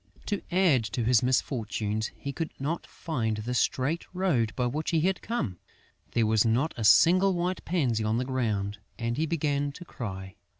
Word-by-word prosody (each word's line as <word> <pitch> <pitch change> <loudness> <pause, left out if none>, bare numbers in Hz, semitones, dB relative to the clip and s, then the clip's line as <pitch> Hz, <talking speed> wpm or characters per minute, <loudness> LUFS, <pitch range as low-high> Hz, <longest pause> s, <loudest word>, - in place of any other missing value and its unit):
To 205 - -2
add 175 -9 +4
to 120 - 0
his 120 0 +4
misfortunes, 110 -4 -1
he 140 - -5
could 160 0 -3
not 155 +5 -3
find 115 -10 -2
the 115 +4 -3
straight 135 +6 0
road 150 - +1
by 125 - 0
which 150 +6 -2
he 165 -2 +2
had 185 +3 +1
come. 120 - -3 0.5
There 115 - +3
was 110 -1 +3
not 120 +8 +1
a 115 - -4
single 185 - +6
white 175 +1 -1
pansy 130 -11 +1
on 110 +1 +1
the 125 - -1
ground; 105 -6 -1 0.2
and 115 0 -2
he 160 +4 0
began 145 -3 0
to 175 - -10
cry. 95 - -7
130 Hz, 180 wpm, -28 LUFS, 110-165 Hz, 0.5 s, single